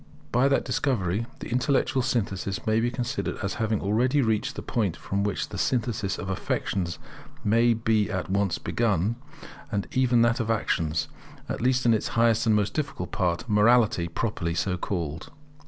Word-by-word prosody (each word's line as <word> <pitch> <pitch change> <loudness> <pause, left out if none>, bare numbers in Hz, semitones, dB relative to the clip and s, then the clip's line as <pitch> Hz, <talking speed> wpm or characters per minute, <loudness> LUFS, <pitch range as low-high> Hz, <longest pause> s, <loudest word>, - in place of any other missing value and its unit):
By 125 +3 +4
that 140 - +2
discovery 110 -5 0
the - - -6
intellectual 130 +1 +1
synthesis 100 -6 -2
may 110 0 +2
be 120 +1 +1
considered 125 +3 -3
as 100 - -1
having 110 -2 0
already 120 +8 +2
reached 115 +4 0
the - - -6
point 100 -8 -1
from 100 +1 -2
which 100 -2 -2
the - - -6
synthesis 110 -5 0
of 95 - -6
affections 95 -2 -2 0.5
may 115 +2 +4
be 110 -2 +1
at 95 -3 -2
once 100 -2 0
begun; 105 -2 0 0.6
and 100 -2 -1
even 125 -2 +3
that 115 +1 +2
of 115 -2 -2
actions, 80 -8 0 0.4
at - - -4
least 130 +1 +2
in 115 - +5
its 110 - 0
highest 115 0 +3
and 110 - +5
most 105 -1 +1
difficult 150 -2 -3
part, 90 +2 -1
morality 105 -3 +4
properly 85 -2 -2
so 90 +1 0
called. 85 -4 -4
110 Hz, 170 wpm, -26 LUFS, 95-120 Hz, 0.6 s, in